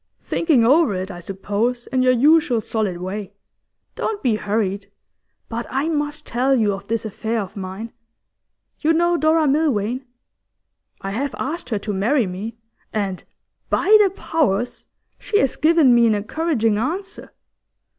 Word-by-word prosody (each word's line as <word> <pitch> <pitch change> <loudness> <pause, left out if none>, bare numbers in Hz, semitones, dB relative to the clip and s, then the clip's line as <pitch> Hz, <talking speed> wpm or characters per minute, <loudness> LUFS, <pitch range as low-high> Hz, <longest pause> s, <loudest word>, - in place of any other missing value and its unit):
'Thinking 295 -9 +2
over 275 - +4
it, 185 +2 -4
I 175 - -8
suppose, 205 +7 -2
in 255 - 0
your 255 0 +4
usual 265 -1 +4
solid 215 -4 -2
way. 190 +2 -5 0.6
Don't 425 -2 -3
be 240 -5 +2
hurried. 205 -2 -2 0.6
But 235 +1 -4
I 275 +5 -1
must 295 -2 -2
tell 260 +3 +1
you 215 -5 +2
of 195 +1 -8
this 225 0 -2
affair 220 +2 -2
of 195 -3 -6
mine. 195 +4 -6 0.9
You 320 +1 +2
know 345 +1 +2
Dora 315 -1 +3
Milvain? 265 -5 +1 1.0
I 195 - -4
have 265 +6 -2
asked 315 -4 -4
her 220 - 0
to 205 +1 -4
marry 225 +6 +2
me, 200 +5 -6 0.3
and, 195 -4 -2 0.5
by 430 - +4
the 400 - +4
Powers! 260 - -1 0.3
she 410 - 0
has 270 - +1
given 310 -5 +4
me 235 -1 +5
an 220 - +3
encouraging 225 -1 0
answer. 360 - -4
235 Hz, 150 wpm, -21 LUFS, 205-300 Hz, 1.0 s, me